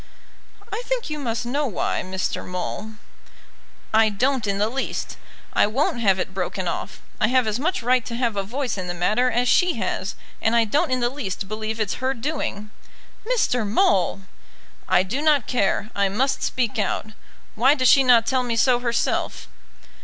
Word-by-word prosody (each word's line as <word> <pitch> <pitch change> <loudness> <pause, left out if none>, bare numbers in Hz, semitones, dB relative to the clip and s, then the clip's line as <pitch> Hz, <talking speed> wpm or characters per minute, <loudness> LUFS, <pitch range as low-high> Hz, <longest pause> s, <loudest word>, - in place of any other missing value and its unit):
"I - - -2
think - - -2
you 300 - -3
must 235 -3 -2
know 280 +4 0
why, 210 - -1
Mr. 185 0 -3
Maule." 180 +4 -5 1.0
"I 220 0 +5
don't 245 +2 0
in 200 -1 0
the 205 +1 +2
least. 265 +4 -3 0.4
I - - +4
won't 240 +2 0
have 195 -4 +3
it 185 - -3
broken 185 0 -3
off. 170 - -5 0.2
I - - +3
have 255 0 +3
as 215 +2 -1
much 325 -2 -1
right 250 0 +3
to 235 - -4
have 235 -3 0
a 200 - 0
voice 240 +1 -3
in 185 - -4
the 175 - -3
matter 215 +8 +2
as 245 +1 +1
she 360 +6 +3
has, 190 -2 -3 0.3
and 225 +1 +2
I 230 -1 +4
don't 275 +8 +1
in 255 -1 0
the 240 - +2
least 200 -8 -4
believe 215 +2 -4
it's 215 +1 -2
her 260 +1 0
doing." 225 -6 -4 0.6
"Mr. 250 - +2
Maule!" 205 - +2 0.7
"I 180 - +4
do 240 +10 -3
not 300 -5 +3
care; 215 -2 0
I 200 -1 +2
must 255 +8 0
speak 240 -4 -1
out. 210 +2 -1 0.4
Why 260 +6 +4
does 255 -3 +2
she 275 - +7
not 240 -3 +5
tell 260 +1 +1
me 240 -2 -2
so 245 +1 +3
herself?" 235 -1 -1
230 Hz, 185 wpm, -23 LUFS, 205-260 Hz, 1.0 s, she